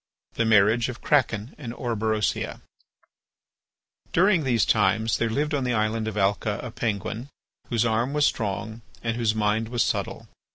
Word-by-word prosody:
THE 115 - 0
MARRIAGE 110 +3 +4
OF 125 +1 -6
KRAKEN 115 -5 +1
AND 120 -4 -6
ORBEROSIA 110 -3 -1 1.5
During 180 -1 +4
these 120 -5 +2
times 110 +3 +2
there 115 - +1
lived 150 +6 -1
in 140 -2 0
the 125 -1 0
island 110 0 0
of 110 -1 -4
Alca 100 +1 +1
a 125 - -6
Penguin 110 +3 -3 0.4
whose 120 -2 +1
arm 115 +3 +1
was 150 0 +2
strong 110 0 -2 0.2
and 115 -1 -1
whose 115 -2 +1
mind 110 +1 0
was 120 -1 +1
subtle. - - -3
115 Hz, 155 wpm, -25 LUFS, 110-125 Hz, 1.5 s, MARRIAGE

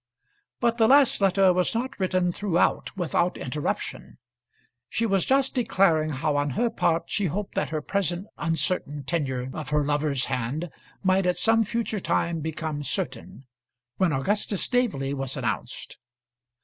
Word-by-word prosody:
But 235 -1 +1
the 220 - +5
last 275 -3 +5
letter 195 -1 +4
was 180 +4 0
not 260 +2 -3
written 185 -1 +1
throughout 190 +1 0
without 175 0 0
interruption. 145 +3 -4 0.7
She 230 - 0
was 195 -4 +1
just 270 0 +2
declaring 190 - +2
how 145 +1 -1
on 145 0 +1
her 240 -1 +2
part 165 0 +1
she 200 +1 -1
hoped 200 +5 -4
that - - -1
her 155 -2 -3
present 185 0 -1
uncertain 165 -3 -1
tenure 130 -3 -2
of 150 -2 -6
her 150 0 +2
lover's 145 -2 +1
hand 140 +8 -3 0.3
might 190 0 +3
at 180 - +1
some 225 0 +4
future 225 -1 -2
time 170 -2 0
become 155 -1 -4
certain, 130 -1 -3 0.5
when 185 -3 +2
Augustus 200 +7 0
Staveley 205 - 0
was 135 -1 -2
announced. 115 -5 -4
175 Hz, 150 wpm, -26 LUFS, 145-205 Hz, 0.7 s, the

